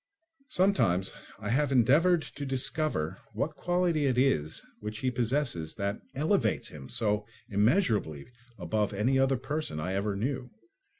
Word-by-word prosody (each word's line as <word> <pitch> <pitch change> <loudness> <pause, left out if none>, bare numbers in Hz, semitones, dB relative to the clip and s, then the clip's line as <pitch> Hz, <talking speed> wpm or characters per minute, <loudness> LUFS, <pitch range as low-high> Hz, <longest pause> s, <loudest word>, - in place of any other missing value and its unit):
Sometimes 180 - +2 0.2
I 105 - -5
have 140 +4 +2
endeavoured 155 +8 +4
to 145 - -8
discover 135 - -1
what 145 +9 -2
quality 175 -4 +1
it 125 -2 +1
is 80 - +1 0.2
which 105 -1 -5
he 130 +3 0
possesses 120 - -1
that 100 0 -2
elevates 140 - +1
him 70 -3 -10
so 105 -2 0 0.2
immeasurably 105 - +2 0.3
above 100 +3 -1
any 125 +7 +2
other 135 0 +3
person 135 - -3
I 90 +5 -2
ever 100 +1 -1
knew. 125 +4 -2
125 Hz, 135 wpm, -29 LUFS, 100-145 Hz, 0.3 s, endeavoured